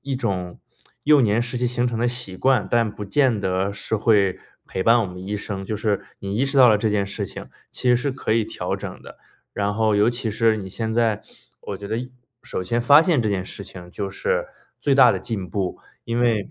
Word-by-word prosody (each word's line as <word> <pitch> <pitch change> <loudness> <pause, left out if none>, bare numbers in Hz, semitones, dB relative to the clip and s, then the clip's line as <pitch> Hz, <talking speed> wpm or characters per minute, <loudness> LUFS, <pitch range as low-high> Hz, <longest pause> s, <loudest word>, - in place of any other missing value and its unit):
一 135 -1 -3
种 90 -7 -3 0.5
幼 150 -1 +6
年 115 -1 +2
时 120 +1 -3
期 125 - 0
形 125 0 0
成 120 -2 -2
的 120 +1 +2
习 120 -7 -4
惯， 130 -2 +2
但 115 -2 +2
不 105 - -7
见 125 +1 +2
得 95 0 -1
是 100 - -4
会 100 -4 +2 0.3
陪 95 - -3
伴 115 +4 +5
我 110 - 0
们 90 +1 -9
一 105 +1 -3
生， 100 -1 -5
就 105 - -3
是 105 -2 -1
你 100 0 -5
意 130 - +2
识 135 0 0
到 125 -2 +8
了 110 - +5
这 105 +1 0
件 100 -1 0
事 - - -4
情， - - -9 0.2
其 125 - -2
实 125 - +6
是 130 +3 -1
可 130 -4 -2
以 115 0 +3
调 - - -4
整 - - -7
的， - - -13 0.3
然 100 0 -1
后 110 0 +2
尤 105 +3 +4
其 120 -1 -4
是 110 +1 +2
你 95 -2 -6
现 110 +3 -3
在 115 -2 +1 0.4
我 100 - -6
觉 100 - -7
得 110 +2 -2 0.5
首 90 - -4
先 120 +5 0
发 145 +5 +8
现 165 -7 +2
这 110 - 0
件 95 -2 -1
事 100 - -8
情 90 -2 -11
就 100 -2 -4
是 95 - -1 0.3
最 140 -2 +2
大 125 -3 +7
的 - - -3
进 100 -6 -4
步， 95 +1 -3 0.3
因 115 +1 -2
为 115 -5 +1
110 Hz, 255 characters per minute, -22 LUFS, 100-120 Hz, 0.5 s, 到